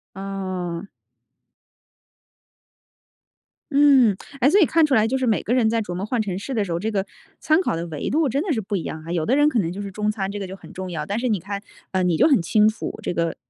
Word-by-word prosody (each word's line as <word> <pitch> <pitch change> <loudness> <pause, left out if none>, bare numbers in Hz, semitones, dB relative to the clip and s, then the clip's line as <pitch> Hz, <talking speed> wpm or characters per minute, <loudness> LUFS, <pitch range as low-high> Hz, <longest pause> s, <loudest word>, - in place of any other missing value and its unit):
哦。 190 -2 -4 2.8
嗯， 275 -7 +5 0.2
哎， 270 +2 +5
所 400 - +5
以 - - +7
看 320 +1 +3
出 285 - 0
来 220 -2 +4
就 265 +3 0
是 260 - -1
每 220 - +1
个 240 - 0
人 235 -4 +3
在 230 0 +1
琢 180 -4 -5
磨 185 +3 -3
换 235 +1 0
城 190 -4 -3
市 265 +6 -5
的 220 - +1
时 190 - -5
候， 170 - -1
这 215 - -2
个 195 -1 -1 0.4
参 310 +2 +3
考 250 - -1
的 165 +1 -3
维 150 -3 -4
度 300 -1 +2
真 275 +5 0
的 350 -4 -1
是 220 - -1
不 205 +1 -3
一 170 - -4
样 155 0 -6
啊。 170 - -6
有 165 -3 0
的 260 - +2
人 295 +1 +4
可 245 - +1
能 170 -4 -1
就 200 - -6
是 200 -1 -6
中 210 +2 -1
餐， 195 -2 -3
这 205 - -5
个 195 - -5
就 190 - -7
很 - - -14
重 185 0 -6
要， 155 -4 -4
但 205 +6 -2
是 250 - -1
你 215 -5 +1
看， 200 +3 -5 0.3
呃， 190 - +1
你 175 -2 +2
就 - - +5
很 260 - +4
清 210 +5 +4
楚， 220 - -5
这 - - -2
个 170 -1 -1
205 Hz, 280 characters per minute, -23 LUFS, 185-250 Hz, 2.8 s, 以